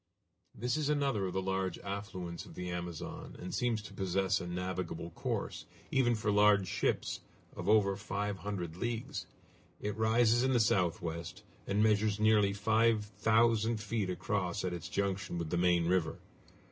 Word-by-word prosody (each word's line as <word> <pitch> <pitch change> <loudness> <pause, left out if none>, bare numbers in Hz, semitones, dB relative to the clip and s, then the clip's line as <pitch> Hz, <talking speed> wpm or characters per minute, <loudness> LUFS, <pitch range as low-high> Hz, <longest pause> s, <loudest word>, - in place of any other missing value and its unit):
This 125 +6 -1
is 150 -2 0
another 135 -9 +1
of 90 - -5
the 95 - -1
large 95 -2 -1
affluents 95 -4 -5
of - - -12
the 90 0 -4
Amazon, 85 -1 -6
and 90 - -6
seems 115 -4 0
to 105 - -10
possess 95 0 0
a 90 - -5
navigable 90 -1 -3
course, - - -3 0.2
even 120 -3 +3
for 110 -1 0
large 105 -1 +5
ships, - - -1 0.4
of 90 +2 -3
over 100 -2 +4
five 100 0 -3
hundred 90 -4 -4
leagues. 120 +2 -3 0.5
It 105 0 -3
rises 115 +1 +4
in 130 +1 +2
the 120 - +4
southwest, 85 -4 0 0.2
and 100 +2 +2
measures 105 -1 +3
nearly 105 -2 +4
five 110 +2 +2
thousand 110 +1 +2
feet 105 -2 -2
across 95 -1 -1
at 90 - -1
its 85 -1 -6
junction 100 0 -1
with 85 -2 -3
the 90 - +1
main 85 -1 +3
river. 85 -2 +1
100 Hz, 160 wpm, -33 LUFS, 90-110 Hz, 0.5 s, large